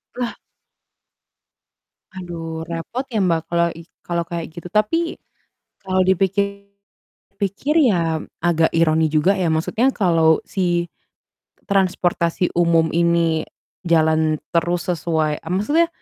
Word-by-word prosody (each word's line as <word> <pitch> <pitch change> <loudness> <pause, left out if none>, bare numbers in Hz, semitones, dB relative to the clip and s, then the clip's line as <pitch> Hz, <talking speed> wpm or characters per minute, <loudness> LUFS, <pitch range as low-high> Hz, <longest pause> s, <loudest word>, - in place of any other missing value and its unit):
Lah. 245 -2 -3 1.8
Aduh, 165 -3 -6
repot 170 +11 -4
ya 225 -5 -2
Mbak 165 -3 +2
kelo 170 0 +2
i - - -9 0.2
kalau 170 -1 -1
kayak 170 -2 -5
gitu. 170 +1 -9
Tapi, 215 - 0 0.7
kalau 185 0 +1
dipikir-pikir 200 +1 -2 0.9
ya 165 -3 0 0.2
agak 165 -2 +3
ironi 160 -1 +3
juga 155 +5 +3
ya. 170 - +1
Maksudnya 195 +11 +1
kalau 165 -5 +3
si 175 -2 0 0.8
transportasi 180 -3 +1
umum 170 -2 +3
ini 170 -2 +2 0.4
jalan 160 -2 +2 0.2
terus 170 +1 0
sesuai 160 -2 -1
eee, 165 - -7
maksudnya 290 - +2
170 Hz, 110 wpm, -20 LUFS, 160-190 Hz, 1.8 s, agak